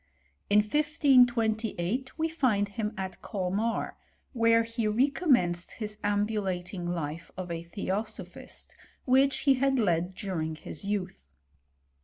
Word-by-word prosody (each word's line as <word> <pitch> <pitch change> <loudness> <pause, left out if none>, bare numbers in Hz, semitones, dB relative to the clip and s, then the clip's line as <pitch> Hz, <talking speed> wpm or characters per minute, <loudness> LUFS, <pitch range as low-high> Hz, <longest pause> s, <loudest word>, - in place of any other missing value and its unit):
In 210 +1 +6
1528 245 - +2
we 320 0 +1
find 245 -11 +1
him 210 0 -3
at 190 -1 -5
Colmarj^ 205 +3 -1 0.4
where 230 -1 +4
he 230 -1 -2
recommenced 240 - +2
his 210 -1 -5
ambulating 200 -4 -1
life 165 -1 -4
of 180 -2 -5
a 165 -1 -3
theOn 195 +4 -2
sophist, - - -8 0.3
which 270 +2 +3
he 275 - +5
had 270 +1 +2
led 180 -4 +1
during 160 -5 -3
his 155 - -6
youth. 195 - -3
210 Hz, 120 wpm, -29 LUFS, 185-245 Hz, 0.4 s, In